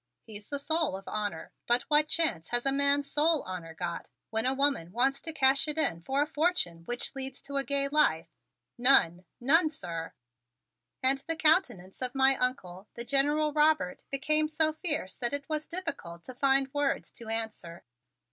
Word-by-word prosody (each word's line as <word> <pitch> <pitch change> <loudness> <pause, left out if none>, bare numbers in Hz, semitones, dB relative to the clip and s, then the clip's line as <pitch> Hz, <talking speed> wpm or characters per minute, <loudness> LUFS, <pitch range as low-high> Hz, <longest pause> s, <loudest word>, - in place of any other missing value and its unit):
He's 210 -2 -10
the 285 - -2
soul 315 - 0
of 195 - -14
honor 205 -6 -4 0.2
but 240 +1 +3
what 300 0 +3
chance 305 - 0
has 240 +1 0
a 275 - +2
man's 280 +1 +2
soul 310 +1 +2
honor 170 -3 -8
got 170 0 -5 0.2
when 225 +2 0
a 260 - +2
woman 275 - +1
wants 265 +6 +1
to 325 - -4
cash 275 -1 +3
it 300 0 -1
in 170 - 0
for 270 - 0
a - - -3
fortune 305 - -1
with 165 - -21 0.3
which 270 -1 -5
to 280 - -8
lead 275 - +1
a - - -11
gay 280 -1 0
life? 300 +2 +2 0.5
None! 185 -9 +4
None, 310 +6 +4
sir!" 170 - -6 0.9
And 270 +1 +4
the 330 - -1
countenance 310 - +1
of 250 0 -3
my 270 0 +4
Uncle, 195 -7 -3
the 235 - -5
General 295 +3 +1
Robert, 300 -10 +1
became 305 +3 +1
so 310 0 +1
fierce 310 - -2
that 240 +1 -1
it 285 -1 -1
was 310 -1 -3
difficult 325 - -5
to 255 - -9
find 270 +1 +2
words 290 -1 -1
to 235 - -10
answer. 220 -7 -4
275 Hz, 185 wpm, -29 LUFS, 215-300 Hz, 0.9 s, None